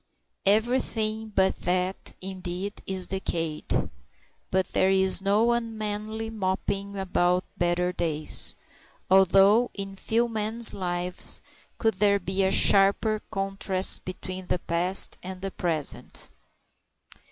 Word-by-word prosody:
Everything 220 0 0
but 190 0 +2
that, 180 +1 -2
indeed, 185 +1 -5
is 190 -1 +1
decayed. 165 -5 -2 0.6
But 190 -1 0
there 190 - +3
is 190 0 +3
no 210 +4 +2
unmanly 220 -1 -3
moping 200 0 -3
about 180 -1 0
better 175 0 0
days, 155 -3 +2 0.6
although 195 +5 +5
in 195 -1 -6
few 230 +4 0
men's 220 +1 +1
lives 180 -1 0 0.3
could 225 -1 +1
there 200 -1 +4
be 190 0 -1
a 190 - +2
sharper 200 +3 +4
contrast 195 -2 0
between 185 0 -7
the - - 0
past 175 +3 0
and 185 0 -8
the 195 - -3
present. 160 -6 -3
195 Hz, 110 wpm, -26 LUFS, 185-215 Hz, 0.6 s, although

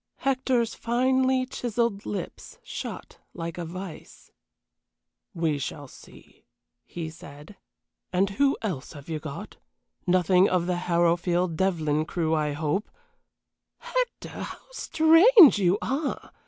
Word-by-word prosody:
Hector's 260 -3 0
finely 260 +2 +1
chiselled 235 -4 -2
lips 205 - -6
shut - - -7 0.2
like 170 0 -5
a 170 - -3
vise. 185 0 -9 1.0
"We 160 -4 0
shall 145 +1 -5
see," - - -17 0.4
he 165 -2 -6
said. 150 +4 -13 0.6
"And 190 +2 +1
who 275 +7 +2
else 170 -11 -4
have 145 0 -12
you 160 -1 -3
got? 150 -2 -8 0.5
None 180 +1 +4
of 180 -2 +1
the 180 0 -1
Harrowfield 175 0 +2
Devlyn 155 -4 0
crew, 160 -2 -1
I 150 -2 0
hope 155 +7 -2 0.5
" - - -60 0.2
"Hector, - - -4
how - - -6
strange 330 - +6
you 185 0 +3
are! 280 +3 -3
180 Hz, 120 wpm, -26 LUFS, 160-245 Hz, 1.0 s, strange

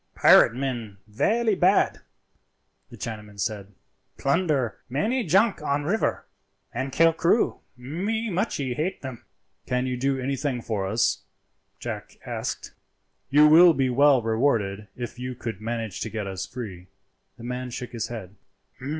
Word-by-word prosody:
"Pirate 115 - +6
men 120 -6 -4
velly 210 - +1
bad," 190 +1 +3 0.9
the - - -12
Chinaman 105 -3 -7
said; 105 -1 -3 0.5
"plunder 140 -5 0
many 220 - 0
junk 195 +3 +3
on 145 -1 0
river 200 +9 0 0.5
and 135 +1 -3
kill 165 +4 +4
crew. 170 +7 +2 0.2
Me 200 - -3
muchee 160 - -1
hate 160 +7 -3
them." 130 -3 -7 0.4
"Can 125 0 0
you 125 -1 -1
do 135 +2 0
anything 135 0 -2
for 105 -4 -2
us?" 110 +4 +1 0.6
Jack - - -6
asked. - - -4 0.6
"You 150 +2 +6
will 165 +2 +8
be 130 -2 +1
well 140 -1 +5
rewarded 110 -4 0
if 120 0 -6
you 125 0 -4
could 115 -4 -6
manage 115 -3 -4
to - - -2
get 110 -2 -4
us 95 -1 -4
free." 100 -8 -8 0.5
The - - -12
man 125 +1 -4
shook 125 0 -6
his 115 -2 -3
head. 105 -6 -7
125 Hz, 140 wpm, -25 LUFS, 115-155 Hz, 0.9 s, will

